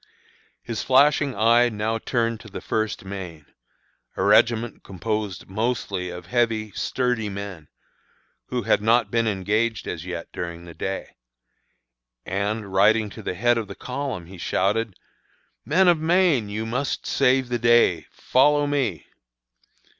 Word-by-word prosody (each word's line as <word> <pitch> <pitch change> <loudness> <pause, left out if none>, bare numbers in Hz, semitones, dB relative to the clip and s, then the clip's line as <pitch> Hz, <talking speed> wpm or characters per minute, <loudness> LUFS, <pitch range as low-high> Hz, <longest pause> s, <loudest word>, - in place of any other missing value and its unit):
His 115 -2 -4
flashing 140 +1 +3
eye 115 +3 +4
now 110 +1 -2
turned 115 -1 -1
to 115 - -13
the 100 - -7
First 110 -2 -2
Maine, 90 -6 -7 0.7
a - - 0
regiment 115 +3 +3
composed 105 +1 -4
mostly 100 -3 -2
of 90 0 -8
heavy, 115 0 0
sturdy 125 -3 -1
men, 95 -6 -7 0.8
who 125 -2 -2
had - - +2
not 115 +3 +3
been 115 -1 +1
engaged 105 +3 0
as - - -4
yet - - -6
during 85 -1 -6
the 85 - -10
day; 95 +3 -5 1.1
and, 100 +1 -3
riding 105 +2 +3
to 110 - -9
the 90 - -4
head 120 +4 +2
of 110 - -5
the - - -8
column, 130 -8 -5
he 90 +1 -12
shouted, 100 +4 0 0.7
"Men 185 +5 +3
of 175 -3 +5
Maine, 160 - +2
you 110 +2 -3
must 125 +5 -2
save 130 -1 +2
the 120 -1 -1
day! 115 -10 +3
Follow 145 +3 +2
me!" 135 - -1
110 Hz, 140 wpm, -24 LUFS, 100-120 Hz, 1.1 s, of